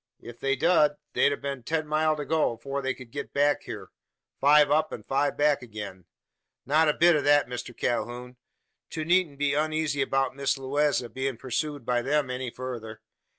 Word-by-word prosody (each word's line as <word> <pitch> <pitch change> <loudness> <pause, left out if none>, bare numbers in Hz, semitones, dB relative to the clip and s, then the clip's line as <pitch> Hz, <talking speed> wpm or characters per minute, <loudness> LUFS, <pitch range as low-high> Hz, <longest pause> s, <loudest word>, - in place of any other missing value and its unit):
"If 120 0 -11
they 135 0 +1
dud, 150 0 +3 0.2
they'd - - +3
hev 140 -2 -4
ten 155 +5 -1
mile 155 +1 +1
to 150 -1 -5
go, 160 -5 +1
afore 135 +4 -5
they 135 -1 -2
ked 125 -3 -13
git 140 0 -6
back 145 +1 +2
hyur 100 -4 -7 0.5
five 145 0 +5
up, 155 +1 +2
an - - -7
five 140 +1 0
back 145 -1 +3
agin. 105 -6 -8 0.6
Not 155 +3 +3
a - - +3
bit 175 0 +5
o' 150 - +1
that, 145 -2 +4
Mister 125 0 -6
Calhoun. 125 +1 -3 0.5
To 155 -2 -4
needn't 175 -4 +2
be 145 0 +1
uneezy 155 -2 0
'bout 135 -1 0
Miss 140 0 0
Lewaze 135 -1 0
bein' 130 -1 -2
pursooed 135 +2 -3
by 120 0 +1
them 140 0 0
any 125 0 -3
further. 115 -3 -7
140 Hz, 185 wpm, -27 LUFS, 125-150 Hz, 0.6 s, five